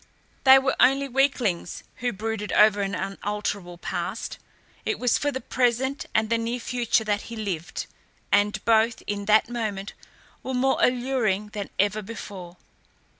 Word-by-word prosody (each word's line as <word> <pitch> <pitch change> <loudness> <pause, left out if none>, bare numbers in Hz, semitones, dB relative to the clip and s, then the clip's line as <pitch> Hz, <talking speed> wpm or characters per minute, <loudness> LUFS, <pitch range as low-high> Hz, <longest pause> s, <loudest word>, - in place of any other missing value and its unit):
They 265 0 +10
were 265 0 +1
only 270 +2 +4
weaklings 250 -10 0
who 245 0 -1
brooded 210 0 -4
over 210 -1 +5
an 195 0 -1
unalterable 195 -2 -4
past. - - -4 0.4
It 435 - -1
was 250 -2 +2
for 290 - 0
the 260 - -3
present 255 +3 0
and 220 +1 +2
the 230 - +3
near 235 +2 -2
future 240 -2 0
that 205 -1 0
he 235 - -6
lived, 190 -7 -4 0.5
and 205 0 +2
both, 225 +1 +3
in 205 -1 -3
that 215 +1 +4
moment, 215 -4 -4 0.5
were 260 - -4
more 265 +2 +2
alluring 240 -5 +1
than 205 -2 -5
ever 205 +2 +1
before. 190 -4 -9
220 Hz, 150 wpm, -25 LUFS, 205-250 Hz, 0.5 s, They